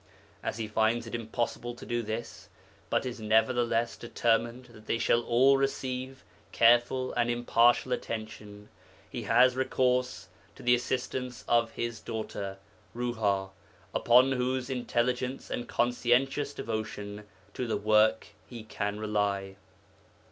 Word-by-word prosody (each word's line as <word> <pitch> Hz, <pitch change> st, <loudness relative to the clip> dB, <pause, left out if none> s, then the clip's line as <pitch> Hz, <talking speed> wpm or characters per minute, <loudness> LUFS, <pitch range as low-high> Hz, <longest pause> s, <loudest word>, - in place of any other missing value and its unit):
As -, -, -3 dB
he 110 Hz, -1 st, -3 dB
finds 110 Hz, +2 st, +1 dB
it 115 Hz, -, -9 dB
impossible 120 Hz, +1 st, -3 dB
to -, -, -11 dB
do 120 Hz, -1 st, -1 dB
this, 110 Hz, +1 st, -6 dB, 0.4 s
but -, -, +1 dB
is 125 Hz, -2 st, -5 dB
nevertheless 115 Hz, +2 st, +2 dB
determined 120 Hz, +1 st, 0 dB
that 110 Hz, -1 st, -16 dB
they -, -, +1 dB
shall 115 Hz, 0 st, +2 dB
all 130 Hz, +4 st, +4 dB
receive 130 Hz, -1 st, -3 dB, 0.3 s
careful 120 Hz, +2 st, +3 dB
and 120 Hz, -1 st, +1 dB
impartial 120 Hz, +1 st, +3 dB
attention, 110 Hz, -3 st, -6 dB, 0.4 s
he -, -, -6 dB
has 125 Hz, +2 st, +5 dB
recourse 125 Hz, -5 st, 0 dB, 0.3 s
to -, -, -13 dB
the 125 Hz, -, +4 dB
assistance 125 Hz, 0 st, -2 dB
of 115 Hz, -1 st, +2 dB
his 120 Hz, -2 st, -4 dB
daughter 105 Hz, -4 st, -5 dB, 0.4 s
Ruha, 105 Hz, -6 st, -1 dB, 0.4 s
upon 125 Hz, +3 st, +5 dB
whose 130 Hz, 0 st, -1 dB
intelligence 125 Hz, +1 st, -1 dB
and 120 Hz, -, -4 dB
conscientious 125 Hz, +4 st, +1 dB
devotion 105 Hz, -2 st, -5 dB, 0.3 s
to 125 Hz, -, -3 dB
the 110 Hz, -, 0 dB
work 110 Hz, +1 st, +3 dB, 0.2 s
he 120 Hz, -3 st, -9 dB
can 105 Hz, -1 st, -3 dB
rely. 100 Hz, -2 st, -1 dB
120 Hz, 125 wpm, -29 LUFS, 110-125 Hz, 0.4 s, has